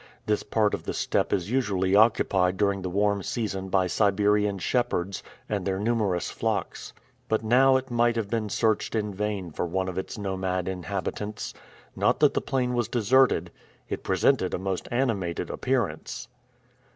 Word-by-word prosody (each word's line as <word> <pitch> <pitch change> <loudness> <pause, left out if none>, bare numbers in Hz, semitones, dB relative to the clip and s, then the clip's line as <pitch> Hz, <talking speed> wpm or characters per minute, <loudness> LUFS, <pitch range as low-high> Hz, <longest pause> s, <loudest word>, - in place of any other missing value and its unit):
This 105 -1 +1
part 105 -2 +1
of - - -2
the - - -3
steppe - - 0
is 100 +2 -1
usually 100 -7 +1
occupied 95 -4 +3
during 100 -1 +1
the 90 - -3
warm 100 +2 +1
season 95 -3 -3
by 95 -1 +2
Siberian 105 +2 +2
shepherds, 100 -3 -1 0.3
and 100 -3 -2
their 95 0 -1
numerous 105 -4 0
flocks. - - -3 0.4
But 110 0 +1
now 130 +4 +5
it 130 0 -6
might 120 0 +2
have 115 -3 -1
been 110 0 -2
searched 110 +2 0
in 105 -2 -1
vain 100 -3 -3
for 85 - -2
one 95 +2 -1
of 95 0 -3
its 95 - -6
nomad 95 -2 -2
inhabitants. 100 +3 -4 0.4
Not - - +2
that - - +5
the - - 0
plain 125 -2 -1
was 120 -2 0
deserted. 120 -6 +3 0.4
It - - -3
presented 95 +2 +2
a - - -2
most 95 0 -3
animated 110 -9 -1
appearance. - - -2
100 Hz, 165 wpm, -26 LUFS, 95-115 Hz, 0.4 s, now